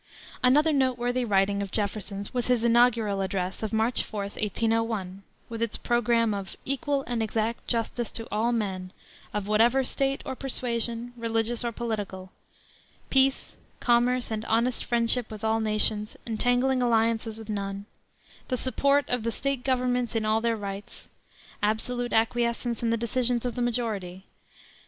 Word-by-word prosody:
Another 295 +5 +4
noteworthy 255 -2 +1
writing 200 -2 +2
of 200 - -3
Jefferson's 200 -1 -3
was 245 -1 -1
his 250 -2 +2
Inaugural 230 -4 +3
Address 190 -1 -2
of 220 -2 -2
March 225 +2 +2
4, 210 - -5
1801, 210 -1 -1 0.3
with 230 -1 -6
its 230 -2 -1
programme 235 -2 +2
of 195 -1 -5
"equal 275 +1 0
and 240 -2 -2
exact 220 +1 -2
justice 235 0 -1
to 225 - -5
all 220 +3 +1
men, 190 -5 -2 0.4
of 205 -1 -3
whatever 230 +5 +4
state 275 +1 0
or 265 - -4
persuasion, 240 -2 -2
religious 230 0 -1
or 235 - -1
political; 205 -5 -4 0.8
peace, 270 0 +2 0.2
commerce, 245 0 +2
and 215 0 -2
honest 235 +2 +1
friendship 235 0 +3
with 215 -1 -9
all 220 0 +2
nations, 215 -1 0
entangling 245 +3 +1
alliances 225 -2 +1
with 220 -1 -10
none; 200 -1 -3 0.6
the 255 - -1
support 280 +2 +2
of 250 -1 0
the 230 +1 -1
State 275 +1 -2
governments 250 -2 0
in 220 -1 0
all 215 +1 +2
their 230 -1 +1
rights;~.~.~. 200 -1 -7 0.5
absolute 240 +3 -1
acquiescence 235 +1 +1
in 235 - +1
the 230 - +2
decisions 240 +1 0
of 245 - -1
the 245 - -3
majority;~.~.~. 215 -7 -2
230 Hz, 150 wpm, -27 LUFS, 215-245 Hz, 0.8 s, Another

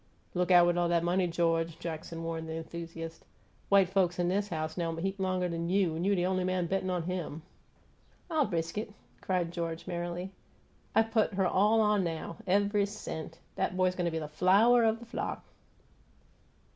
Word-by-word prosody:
"Look 180 0 0
out 175 -1 +7
with 175 0 +2
all 175 0 +1
'at 170 -1 +2
money, 180 +1 +2
George!" 165 -1 0
Jackson 165 0 -6
warned 165 -1 -4
the 160 - -3
enthusiast. 165 0 -7 0.5
"White 195 -2 +6
folks 185 -2 +1
'n 175 0 +2
'is 200 +2 0
house 155 -1 -3
know 170 -2 -1
'im 165 - -4
heap 195 +3 -2
longer'n 180 -3 -1
you. 185 -4 +2
You 190 +5 +1
the 175 -1 +1
on'y 185 0 +1
man 185 -1 0
bettin' 190 +1 -1
on 180 -2 -1
'im!" 165 -3 -4 0.8
"I 315 -4 +2
risk 165 -1 -2
it!" 210 -1 -7 0.3
cried 180 -3 0
George, 165 -1 -4
merrily. 175 +1 -4 0.6
"I 225 - +6
put 220 -3 0
her 190 -1 +2
all 210 +5 +4
on 210 -2 +3
now 165 -1 -4
ev'y 200 +2 +3
cent! 165 -5 -7 0.2
'At 185 - 0
boy's 185 0 +3
go' 180 -2 -1
be 160 -1 -2
flower 200 +10 +4
o' 220 0 +3
the 235 +1 -11
flock!" 235 - -4
180 Hz, 180 wpm, -30 LUFS, 165-195 Hz, 0.8 s, out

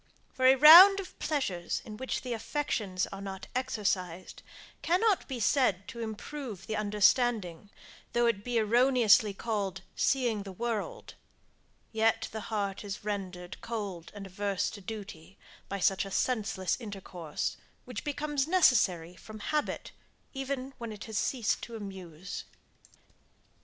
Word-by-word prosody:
For 255 0 +3
a 260 - +8
round 345 +8 +10
of 380 - -9
pleasures 190 - -1
in 215 - -8
which 260 +4 -4
the 250 -2 -3
affections 220 -6 -2
are 195 - -7
not 195 0 -6
exercised, 190 -8 -2 0.4
cannot 375 +4 +2
be 260 -3 -4
said 210 -5 +2
to 235 -3 -8
improve 220 -1 -6
the 220 - -3
understanding, 210 -3 +1 0.4
though 240 0 +3
it 215 -4 +1
be 245 0 -1
erroneously 225 -2 +4
called 200 -4 -3
seeing 240 -6 +1
the 195 -1 -8
world; 235 - -4 0.8
yet 220 0 +1
the 220 - -5
heart 200 -3 -2
is 205 0 -6
rendered 185 -3 -5
cold 200 -7 -5
and 200 -1 -7
averse 195 +1 -2
to 205 - -10
duty, 195 -4 -9 0.3
by 200 - -2
such 195 0 +2
a 195 - -7
senseless 210 -1 -1
intercourse, 190 -7 -5 0.3
which 250 -4 -6
becomes 290 -1 -1
necessary 205 - +3
from 215 +4 -11
habit, 300 +7 -2 0.4
even 270 -1 -4
when 230 -2 -5
it 210 -1 -8
has 220 -3 -3
ceased 240 -6 0
to 235 - -7
amuse. 190 -4 -7
215 Hz, 135 wpm, -30 LUFS, 195-255 Hz, 0.8 s, round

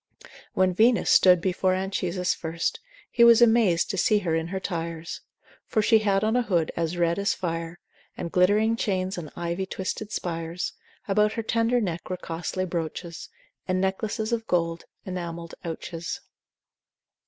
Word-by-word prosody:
——— - - -20
When 185 -1 +3
Venus 230 +5 +3
stood 180 -2 +6
before 185 0 +1
Anchises 185 -1 -1
first, 165 - -3 0.3
He 235 - +4
was 235 -1 +8
amaz'd 225 -7 +4
to 195 - -4
see 210 - +4
her 180 -5 -1
in 160 0 0
her 190 +2 -3
tires; 170 -3 -4 0.5
For 215 - +1
she 225 +1 +5
had 200 -2 +1
on 220 +2 +1
a 250 - +4
hood 175 -8 0
as 165 +1 -2
red 170 +1 +1
as 200 - +1
fire, 165 -2 -4 0.4
And 170 - -4
glittering 210 +5 +3
chains, 190 -3 -1
and 155 -3 -7
ivy 175 +2 -3
twisted 200 +3 -4
spires, 165 0 -3 0.3
About 210 +1 +2
her 225 - -3
tender 230 +2 +2
neck 175 -6 -3
were 185 - -2
costly 175 +2 -3
brooches, 170 -1 -5 0.4
And 185 0 +1
necklaces 215 +4 -1
of 225 -1 -2
gold, 165 -1 0 0.2
enamell'd 170 -2 -5
ouches. 165 +1 -5
185 Hz, 160 wpm, -26 LUFS, 170-210 Hz, 0.5 s, was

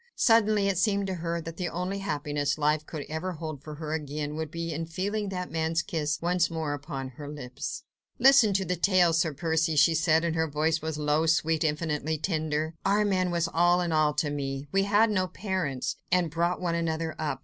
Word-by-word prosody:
Suddenly 215 -3 +4
it 195 -3 +1
seemed 200 -1 +2
to 190 - -2
her 170 -1 -3
that 165 +1 -8
the 180 -2 -2
only 180 +3 -3
happiness 145 -6 -1
life 150 0 +1
could 150 -3 -6
ever 160 +4 -3
hold 155 -3 -6
for 150 0 -8
her 155 0 -5
again 150 -1 -3
would 160 -1 -3
be 165 +1 -4
in 165 +2 -4
feeling 200 +5 -2
that 180 -1 -4
man's 160 +1 0
kiss 155 -5 -2
once 175 0 +1
more 160 -3 -2
upon 135 -2 -5
her 145 +3 -9
lips. 135 -4 -6 0.3
"Listen 255 -4 +6
to 190 0 +1
the 180 - -1
tale, 180 -1 +3
Sir 160 0 +2
Percy," 160 +2 0
she 155 +3 +5
said, 160 0 +3
and 165 -1 -1
her 160 0 +1
voice 155 +2 0
now 160 - -5
was 160 -2 -3
low, 150 +2 +1
sweet, 160 0 +2
infinitely 155 0 -1
tender. 155 -1 -1
"Armand 195 -2 +2
was 170 -1 +1
all 175 +1 +4
in 175 -2 -1
all 155 -2 +2
to 150 0 0
me! 135 -1 -4
We 195 0 +2
had 210 +2 +4
no 185 -3 +1
parents, 180 -9 -3
and 175 -3 +2
brought 170 +2 0
one 175 -2 -1
another 165 -1 -2
up. 155 -1 -2
165 Hz, 210 wpm, -28 LUFS, 150-180 Hz, 0.3 s, Listen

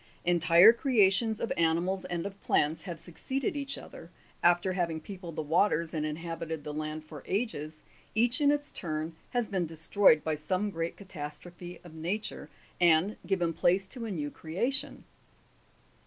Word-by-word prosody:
Entire 175 +4 +7
creations 220 -3 +3
of - - -1
animals 170 +3 +1
and 175 -1 -3
of 200 0 -7
plants 155 +2 +1
have 175 -4 -6
suc 175 +1 -10
ceeded 270 - -2
each 280 -1 -3
other; 165 - -11 0.3
after 175 +2 +3
having 170 -3 -1
peopled 180 -1 -9
the 155 - -2
waters 165 +1 +2
and 155 -1 -1
inhabited 165 0 -5
the 150 - -5
land 155 +1 -4
for 155 -2 -10
ages, 160 -8 -3 0.3
each 240 +4 +2
in 285 - +5
its 290 0 0
turn 160 -1 -4
has 245 -2 0
been 185 -4 -1
destroyed 160 +1 +4
by 160 - 0
some 185 +7 -1
great 165 -1 -3
catastrophe 175 0 -8
of 175 -3 -12
nature, 170 0 -4 0.3
and 175 +4 +4
given 175 -4 +1
place 185 +4 +2
to 235 +3 -7
a - - -4
new 150 -7 -3
creation. 235 - -2
175 Hz, 160 wpm, -30 LUFS, 160-200 Hz, 0.3 s, Entire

